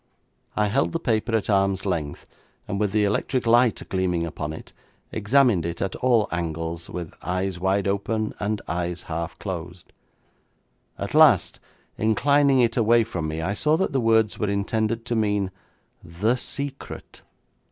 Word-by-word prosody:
I 105 - +2
held 125 +11 +1
the 165 - 0
paper 115 -5 0
at 110 - 0
arm's 100 -1 +1
length, 80 -7 -3 0.4
and 100 - -3
with 105 -2 +1
the 105 0 +2
electric 115 +5 0
light 120 0 +3
gleaming 90 -3 0
upon 75 -1 -5
it, 80 - -10 0.4
examined 110 -3 +3
it 85 0 -4
at 95 - -2
all 120 -5 +3
angles, 80 0 -3
with 85 -3 -6
eyes 90 0 -2
wide 95 +2 +1
open, 105 +2 -1
and 105 0 -2
eyes 85 0 -3
half 85 0 -5
closed. 90 -2 -7 1.0
At 100 - -5
last, 145 - +5 0.4
inclining 135 +5 +3
it 115 -1 +2
away 115 0 +4
from 90 -8 -4
me, 80 +1 -3
I 95 +5 -1
saw 150 +9 +2
that 190 - -1
the 135 - +1
words 110 -2 +2
were 105 - 0
intended 110 +3 -1
to 120 - -1
mean, 105 -3 0 0.5
'The 100 +9 0
Secret'. 140 +2 -6
100 Hz, 155 wpm, -24 LUFS, 90-115 Hz, 1.0 s, last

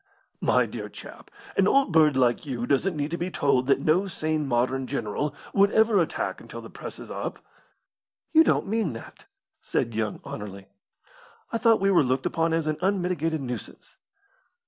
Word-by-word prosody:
"My - - +3
dear - - -6
chap, - - -12 0.3
an 195 - +4
old 275 -5 +3
bird 155 -4 +5
like 120 -2 +2
you 125 -5 -3
doesn't 155 +7 +1
need 145 +1 -2
to 170 - -3
be 175 +2 -2
told 135 -6 +1
that 140 0 +3
no 175 +7 +2
sane 155 -4 -2
modern 130 +1 0
general 140 +3 -2 0.2
would 200 0 +5
ever 220 -2 +4
attack 165 - -2
until - - -9
the - - -11
Press - - -8
is - - -10
up." - - -4 1.0
"You 320 0 +8
don't - - +2
mean 210 - -1
that?" 115 - -11 0.4
said 115 - -1
young 110 -1 -2
Anerley. 100 -2 -7 0.9
"I 230 - 0
thought 225 -2 +4
we 195 +1 +2
were 180 - +5
looked 130 -1 0
upon 165 0 +1
as 165 -1 0
an 155 -1 -1
unmitigated 180 -5 0
nuisance." 125 -2 -7
155 Hz, 175 wpm, -26 LUFS, 130-185 Hz, 1.0 s, You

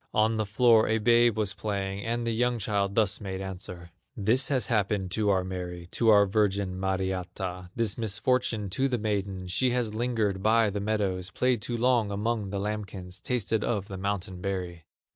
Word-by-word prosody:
On 110 +1 +3
the 110 -1 -1
floor 115 +1 +4
a 110 - +2
babe 120 0 +4
was 105 -3 +1
playing, 100 -1 -3
And 120 +1 -2
the 115 - 0
young 120 +2 +1
child 100 -2 -1
thus 105 -2 +2
made 95 -2 -4
answer: 90 -2 -7 0.3
"This 115 +6 +2
has 130 -3 +1
happened 100 -5 0
to 105 0 +1
our 95 -2 +2
Mary, 90 -2 -6
To 115 - +2
our 100 -1 +7
virgin, 100 -2 0
Mariatta, 95 -1 -3
This 115 -2 0
misfortune 110 -1 0
to 135 +7 +1
the 125 -2 0
maiden: 100 -3 -2
She 110 +8 +1
has 115 -4 -1
lingered 110 -4 0
by 110 0 +3
the 100 - -3
meadows, 100 -3 -1
Played 125 +2 +1
too 120 +3 -3
long 120 -3 +2
among 105 0 -1
the 100 0 -3
lambkins, 100 -3 -5
Tasted 115 -3 -1
of 105 -3 -2
the 95 - -5
mountain 95 -2 -3
berry." 90 -4 -4
105 Hz, 180 wpm, -28 LUFS, 95-115 Hz, 0.3 s, our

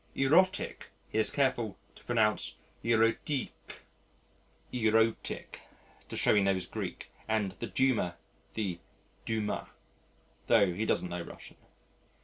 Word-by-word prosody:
"Erotic" 170 +8 +3 0.2
he 110 - +1
is 110 - +4
careful 125 -7 0 0.2
to - - -17
pronounce 110 -3 +1 0.3
eròtic 115 +4 +2 1.2
to 110 -1 -1
show - - +4
he 105 - +5
knows 95 -1 +1
Greek, - - -6 0.2
and 110 -3 +1
the 115 - -3
"Duma," 110 -5 +1 0.4
the 95 -6 -2 0.5
Dumà, 110 -2 -1 0.8
tho' 100 -6 +5
he 110 +5 -2
doesn't 90 - +1
know 90 0 -3
Russian. - - -11
110 Hz, 110 wpm, -31 LUFS, 100-120 Hz, 1.2 s, he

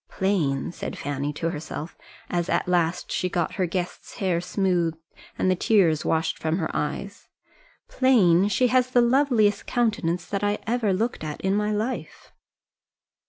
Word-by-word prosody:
"Plain," 165 -10 0
said - - -6
Fanny 145 0 -3
to 165 +3 -2
herself, 155 +1 -6 0.3
as 175 -1 -2
at - - 0
last 175 0 0
she 180 - -1
got 175 -1 -1
her 185 -2 +1
guest's 180 +1 -5
hair 180 -4 0
smoothed 175 -3 0 0.4
and 185 - +2
the - - +2
tears 175 -6 +3
washed 160 0 0
from 160 +1 0
her 160 -4 -3
eyes 195 +7 -4 0.6
"plain! 200 -9 +4
She 245 +5 +2
has 255 0 +3
the 245 -1 +4
loveliest 240 -5 +2
countenance 210 -8 0
that 200 +4 -3
I 205 0 +1
ever 225 -2 +1
looked 220 0 -1
at 150 -1 -5
in 190 0 +1
my 210 0 0
life!" 220 +5 -4
185 Hz, 160 wpm, -25 LUFS, 165-210 Hz, 0.6 s, plain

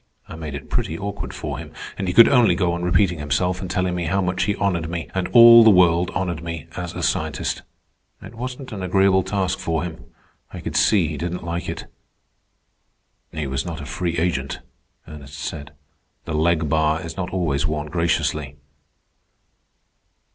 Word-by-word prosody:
I - - -9
made 80 -3 -6
it 70 - -8
pretty 80 - -2
awkward 100 +2 -5
for - - -5
him, - - -9 0.2
and 95 - -4
he 90 - -1
could 115 - +9
only 125 -4 +4
go 90 -3 +1
on 85 - -3
repeating 90 -1 +2
himself 90 +6 -1
and 95 - -5
telling 90 -1 0
me 90 -1 -2
how 95 +4 0
much 90 -1 0
he 105 - 0
honored 85 -6 -1
me, 85 -1 -4
and 95 -1 -1
all 115 -1 +9
the 110 - +7
world 90 -2 +4
honored 85 -4 -2
me, 85 -3 -6
as 90 -2 -5
a - - -4
scientist. - - -1 0.6
It - - -11
wasn't 125 +3 -7
an 105 -3 -6
agreeable 95 +1 +3
task 95 -1 -2
for 80 -1 -1
him. 85 -2 -7 0.5
I - - -7
could - - -6
see - - +3
he - - -5
didn't 90 +1 -4
like 85 +1 -4
it." - - -5 1.5
"He 80 -2 -4
was 70 0 -2
not 85 -2 -6
a 70 - -7
free 85 +4 -3
agent," 80 -5 -1 0.5
Ernest 75 -1 -10
said. 75 -2 -6 0.5
"The 80 - -4
leg 80 0 +1
bar 80 +1 +1
is 85 -1 -7
not 90 -2 -3
always 80 -5 -1
worn 75 -1 -2
graciously." 80 -4 -1
85 Hz, 185 wpm, -22 LUFS, 80-95 Hz, 1.5 s, could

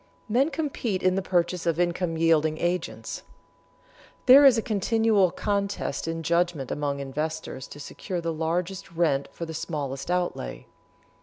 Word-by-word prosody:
Men 255 +7 +2
compete 265 - -2
in 185 0 +4
the 195 - 0
purchase 175 -1 0
of 165 0 +1
income 175 -1 0
yielding 160 -1 +3
agents. 175 0 -3 1.0
There 270 +3 +9
is 260 -4 +7
a - - +2
continual 215 -2 +2
contest 200 -6 -2
in 165 0 -3
judgment 170 -4 0
among 145 -1 -2
investors 140 -1 -4
to 145 - -11
secure 180 +5 -5
the 165 -1 -2
largest 170 +4 -2
rent 155 -5 +1
for 170 - -6
the 160 - -7
smallest 150 -4 -4
outlay. 175 - -2
170 Hz, 145 wpm, -26 LUFS, 160-195 Hz, 1.0 s, There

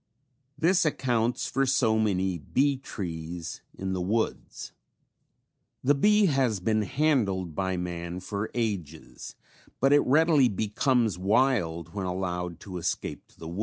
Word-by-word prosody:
This 175 +2 +3
accounts 120 -6 0
for 135 0 0
so 120 -5 +2
many 95 -4 0
bee 140 - +1
trees 85 -8 -6 0.2
in 95 0 -3
the 90 - -2
woods. 110 +5 -2 1.1
The 140 +3 +4
bee 210 +8 +4
has 135 - +1
been 110 +3 +1
handled 100 - 0
by 95 +1 -1
man 85 0 -4
for 100 +3 -4
ages, 95 -10 -4 0.4
but 135 +2 +4
it 145 - +7
readily 150 -1 +4
becomes 110 - +1
wild 90 - +1
when 100 -2 -3
allowed 90 -2 -3
to 95 -3 -7
escape 80 - -3
to - - -26
the 80 - -8
woods. 85 +4 -6
105 Hz, 135 wpm, -27 LUFS, 90-130 Hz, 1.1 s, it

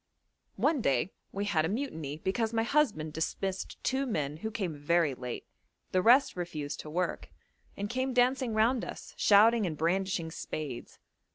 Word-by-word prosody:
One 295 -6 +2
day 140 - +1 0.2
we 200 +1 -2
had 170 -6 +2
a 160 - 0
mutiny 160 - -3
because 220 +7 -1
my 225 0 +2
husband 225 - +1
dismissed 190 +4 -3
two 270 +1 0
men 150 - -2
who 220 +7 -4
came 190 -7 -3
very 150 0 +2
late; 125 -1 -6 0.5
the 185 - +3
rest 250 +7 +5
refused 155 -5 -4
to 150 - -7
work, 180 +4 -2 0.5
and 200 - -2
came 255 +4 -1
dancing 250 -1 +2
round 230 +3 +3
us, - - -8
shouting 215 +1 +5
and 155 -3 -4
brandishing 175 +1 0
spades. 145 -6 -6
190 Hz, 160 wpm, -30 LUFS, 155-230 Hz, 0.5 s, rest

